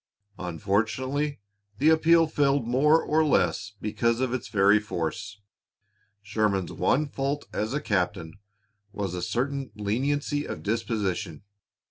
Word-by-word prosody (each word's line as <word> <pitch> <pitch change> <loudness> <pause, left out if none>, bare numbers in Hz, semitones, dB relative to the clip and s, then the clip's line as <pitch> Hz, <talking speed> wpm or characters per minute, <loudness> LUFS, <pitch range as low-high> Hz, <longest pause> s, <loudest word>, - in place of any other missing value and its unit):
Unfortunately, 115 - -1 0.4
the 150 +7 +4
appeal 165 +1 +5
failed 140 -4 +1
more 150 +6 +4
or 160 +1 +2
less 95 - +1
because 115 +2 0
of 130 -1 0
its 130 - -3
very 105 0 +4
force. 105 +2 -4 0.8
Sherman's 100 -3 0
one 150 +3 +1
fault 140 +1 -3
as 110 +6 -2
a - - +1
captain 90 - -2 0.5
was 100 -3 -4
a 90 - -3
certain 135 +6 -2
leniency 140 +8 -1
of - - -6
disposition. 100 -7 -2
115 Hz, 120 wpm, -26 LUFS, 100-140 Hz, 0.8 s, appeal